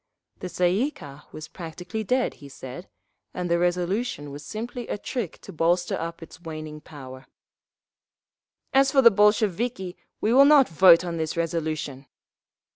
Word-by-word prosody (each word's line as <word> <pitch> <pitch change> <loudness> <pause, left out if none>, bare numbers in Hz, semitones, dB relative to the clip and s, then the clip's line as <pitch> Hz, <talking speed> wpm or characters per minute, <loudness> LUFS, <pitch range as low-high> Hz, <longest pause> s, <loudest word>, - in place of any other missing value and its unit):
The 185 - -5
Tsay 175 0 +1
ee 245 +9 +1
kah 145 - -13
was 155 0 -8
practically 180 +5 -7
dead, 250 +4 0
he 140 - -11
said, 130 +6 -10 0.5
and 180 -1 -3
the 170 - +3
resolution 180 -2 -1
was 145 +1 -9
simply 235 +7 -6
a - - -3
trick 220 -5 -5
to 195 - -11
bolster 175 +2 +1
up 165 0 -6
its 165 +1 -14
waning 155 -2 -7
power…. 130 -3 -11 1.5
"As 270 0 +4
for 275 - -4
us, - - +11
Bolsheviki, 210 -1 +1 0.2
we 220 - +1
will 275 +2 +7
not 285 -2 +6
vote 170 +1 +6
on 170 -1 -4
this 160 0 -3
resolution!" 155 -5 -3
175 Hz, 155 wpm, -25 LUFS, 155-215 Hz, 1.5 s, us